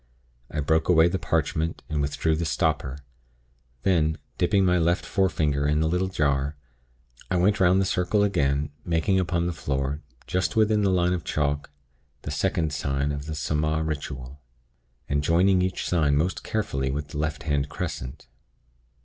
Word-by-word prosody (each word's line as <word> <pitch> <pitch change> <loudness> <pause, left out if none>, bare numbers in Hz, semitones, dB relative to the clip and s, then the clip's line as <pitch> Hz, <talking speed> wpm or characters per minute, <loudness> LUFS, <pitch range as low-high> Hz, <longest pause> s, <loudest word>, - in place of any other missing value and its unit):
I 75 - -2
broke 80 +4 +1
away 85 -1 +6
the 95 - -2
parchment, 80 +1 -1
and 75 -1 -1
withdrew 75 +3 0
the 85 - -2
stopper. 75 -4 0 0.9
Then, 80 -4 +2 0.2
dipping 95 +2 +3
my 90 -1 +3
left 85 +2 +1
forefinger 75 -8 +1
in 75 +1 +2
the 80 - +2
little 90 +3 +1
jar, 70 -5 0 0.7
I 95 - 0
went 95 +3 +3
'round 95 0 +5
the 95 - +2
circle 95 +2 +1
again, 75 -7 +1
making 85 +4 +1
upon 85 -1 0
the 90 - -1
floor, 70 -1 -2 0.2
just 95 +5 -1
within 110 -1 +3
the 100 - +3
line 90 -1 +2
of 90 -2 -3
chalk, 75 -1 -1 0.5
the - - -4
Second 80 -2 0
Sign 70 0 -1
of 70 0 -5
the 80 - -3
Saaamaaa 75 +1 0
Ritual, 70 -2 -5 0.7
and 70 +1 0
joining 90 +4 +4
each 95 0 -1
Sign 75 -5 +2
most 85 +5 -1
carefully 70 -11 -1
with 75 +2 -3
the 75 - -5
left 75 -1 -2
handed 70 -1 0
crescent. 65 0 -5
80 Hz, 165 wpm, -25 LUFS, 70-90 Hz, 0.9 s, away